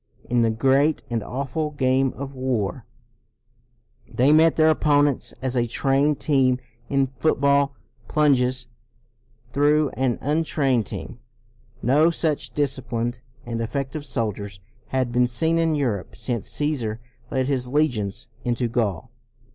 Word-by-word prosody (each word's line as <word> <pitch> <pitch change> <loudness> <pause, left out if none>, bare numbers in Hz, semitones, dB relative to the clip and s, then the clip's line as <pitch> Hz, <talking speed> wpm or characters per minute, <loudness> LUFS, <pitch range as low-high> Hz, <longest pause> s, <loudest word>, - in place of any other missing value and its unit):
In 120 -1 +2
the 115 - +3
great 135 +7 +2
and 115 -2 0
awful 140 +6 -3
game 135 -2 +1
of 140 0 -7
war, 130 -3 -2 1.3
they 130 +4 +3
met 160 +1 +5
their 160 0 +5
opponents 145 -3 +2
as 130 -1 -1
a 120 -1 +1
trained 140 +4 +1
team 130 -4 +2 0.3
in 135 -1 +2
football 140 +1 +1 0.3
plunges 130 -4 +2 0.9
through 150 +1 +3
an 130 -2 0
untrained 140 - 0
team. - - -7 0.6
No 145 +7 +4
such 160 -3 -1
disciplined 125 -4 -2 0.2
and 115 -1 -3
effective 135 +5 -3
soldiers 105 -5 -3 0.3
had 130 -2 -1
been 125 +1 +3
seen 160 +7 +1
in 165 -1 +2
Europe 120 -10 -2
since 115 -1 -2
Caesar 125 -8 -1 0.3
led 130 -1 0
his 130 -3 -1
legions 125 -9 0 0.2
into 120 0 0
Gaul. 110 -8 -2
130 Hz, 125 wpm, -23 LUFS, 120-145 Hz, 1.3 s, met